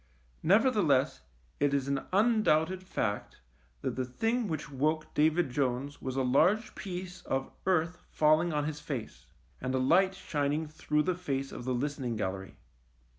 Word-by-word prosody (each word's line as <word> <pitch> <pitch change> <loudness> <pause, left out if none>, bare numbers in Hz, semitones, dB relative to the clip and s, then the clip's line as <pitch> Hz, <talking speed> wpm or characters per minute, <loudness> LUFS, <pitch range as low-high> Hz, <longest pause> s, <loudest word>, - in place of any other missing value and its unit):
Nevertheless 180 - +3 0.4
it 145 0 +2
is 135 -1 0
an 140 -1 -2
undoubted 190 -5 +3
fact 110 - -3 0.4
that - - -1
the 130 - -1
thing 225 - -1
which 155 -4 -4
woke 155 +3 -1
David 155 -1 +2
Jones 135 +2 -1
was 130 -1 -4
a 135 - +1
large 180 - +3
piece 185 -1 -6
of 135 0 -2 0.2
earth 180 -1 +1
fall 155 +1 +4
ing 175 0 -1
on 150 -1 0
his 150 -1 -3
face, 135 -7 -6 0.3
and 130 +1 -1
a - - +2
light 180 +9 +3
shining 150 -2 -1
through 150 0 0
the 185 - +1
face 140 -6 -3
of 120 - -7
the 130 - 0
listening 135 -2 -2
gallery. 95 -2 -4
150 Hz, 160 wpm, -30 LUFS, 135-180 Hz, 0.4 s, fall